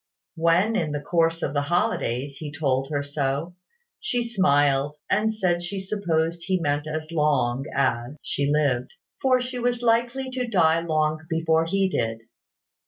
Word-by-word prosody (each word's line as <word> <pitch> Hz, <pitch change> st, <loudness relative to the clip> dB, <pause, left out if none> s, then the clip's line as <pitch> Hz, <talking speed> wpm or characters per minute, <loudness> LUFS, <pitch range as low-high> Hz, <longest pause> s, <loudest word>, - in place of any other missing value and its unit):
When, 170 Hz, +6 st, +2 dB
in 155 Hz, -8 st, 0 dB
the 145 Hz, -, -1 dB
course 165 Hz, +2 st, +1 dB
of 140 Hz, -, -1 dB
the 145 Hz, -, +1 dB
holidays, 140 Hz, -4 st, -1 dB
he 150 Hz, -2 st, -6 dB
told 135 Hz, -3 st, 0 dB
her 145 Hz, -2 st, -1 dB
so, 145 Hz, +3 st, -2 dB, 0.5 s
she 245 Hz, -1 st, 0 dB
smiled, 145 Hz, -10 st, +2 dB, 0.2 s
and 215 Hz, +2 st, +2 dB
said 180 Hz, -5 st, 0 dB
she 190 Hz, +3 st, -3 dB
supposed 170 Hz, -4 st, -1 dB
he 185 Hz, -1 st, +1 dB
meant 145 Hz, -1 st, -1 dB
as 155 Hz, +1 st, -4 dB
long 145 Hz, -5 st, +1 dB
as 130 Hz, 0 st, -1 dB
she 140 Hz, 0 st, 0 dB
lived; 135 Hz, -5 st, +1 dB, 0.3 s
for 260 Hz, -1 st, +4 dB
she 250 Hz, 0 st, -4 dB
was 245 Hz, 0 st, 0 dB
likely 240 Hz, +3 st, +1 dB
to 255 Hz, -1 st, -2 dB
die 165 Hz, -7 st, +3 dB
long 155 Hz, -2 st, 0 dB
before 165 Hz, 0 st, +2 dB
he 195 Hz, +3 st, +1 dB
did. 115 Hz, -10 st, -2 dB
160 Hz, 160 wpm, -25 LUFS, 145-195 Hz, 0.5 s, for